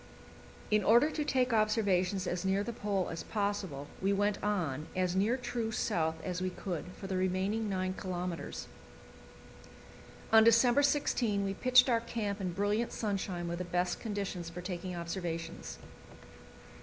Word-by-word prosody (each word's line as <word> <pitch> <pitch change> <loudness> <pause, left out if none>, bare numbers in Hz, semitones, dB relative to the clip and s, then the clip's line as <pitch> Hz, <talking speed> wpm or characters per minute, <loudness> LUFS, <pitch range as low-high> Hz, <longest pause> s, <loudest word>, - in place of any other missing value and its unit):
In 210 -1 +4
order 240 +9 +5
to 305 - -1
take 255 -4 +1
observations 200 -4 +2
as 175 0 -2
near 190 +1 +1
the 235 - -4
Pole 200 -4 -1
as 165 - -4
possible, 200 -9 -2 0.2
we 195 +1 +2
went 205 +1 +1
on, 165 -8 -1
as 185 -1 0
near 215 +6 +2
true 240 -3 -3
south 160 -6 0
as 180 -1 -3
we 185 - 0
could, 180 -2 -4
for - - -8
the 190 -1 -2
remaining 190 +4 0
9 185 -1 -1
kilometres. 180 -2 -4 1.7
On 220 0 +9
December 235 +4 +5
16 240 -8 +1
we 195 0 -1
pitched 250 +4 +5
our 235 -3 +3
camp 215 -3 -3
in 185 -2 -1
brilliant 205 +5 0
sunshine, 190 -5 -2
with 170 +1 -3
the - - -1
best 180 0 -1
conditions 200 -6 -4
for 175 +1 -7
taking 180 0 -4
observations. 170 -1 -4
195 Hz, 155 wpm, -32 LUFS, 180-220 Hz, 1.7 s, On